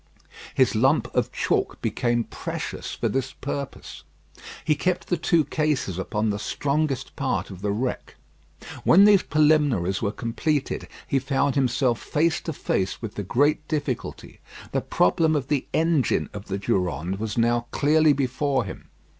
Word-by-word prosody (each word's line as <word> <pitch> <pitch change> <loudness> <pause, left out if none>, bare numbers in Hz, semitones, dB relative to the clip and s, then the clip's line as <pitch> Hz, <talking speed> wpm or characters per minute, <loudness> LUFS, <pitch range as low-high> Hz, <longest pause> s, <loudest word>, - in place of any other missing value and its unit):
His - - +3
lump - - +2
of - - 0
chalk - - -1
became 120 -1 0
precious - - -5
for - - -1
this 130 -1 -2
purpose. 140 0 -6 0.6
He 155 - +4
kept 175 +2 -1
the 175 - +2
two 165 -1 +2
cases 150 - -1
upon 105 +2 -1
the 100 - -3
strongest 140 +4 -1
part - - -2
of 95 -1 -10
the 105 - -1
wreck. 120 +5 -3 0.7
When 195 +4 +7
these 205 -2 +6
preliminaries 145 - +2
were 100 - 0
completed, 135 +6 -2 0.2
he 135 - +2
found 140 +1 0
himself 130 -3 +1
face 160 +2 +1
to 160 - -4
face 95 -8 -1
with 110 -3 -6
the - - -4
great 145 +9 +1
difficulty. 145 -6 -4 0.3
The - - 0
problem 155 - +2
of 140 -2 -2
the 145 -3 0
engine 160 -6 +1
of 100 -1 -7
the 95 - -3
Durande 95 -1 -1
was 110 +1 -4
now 120 +1 +2
clearly 155 +1 +4
before 135 0 0
him. 95 - -9
135 Hz, 155 wpm, -24 LUFS, 110-150 Hz, 0.7 s, When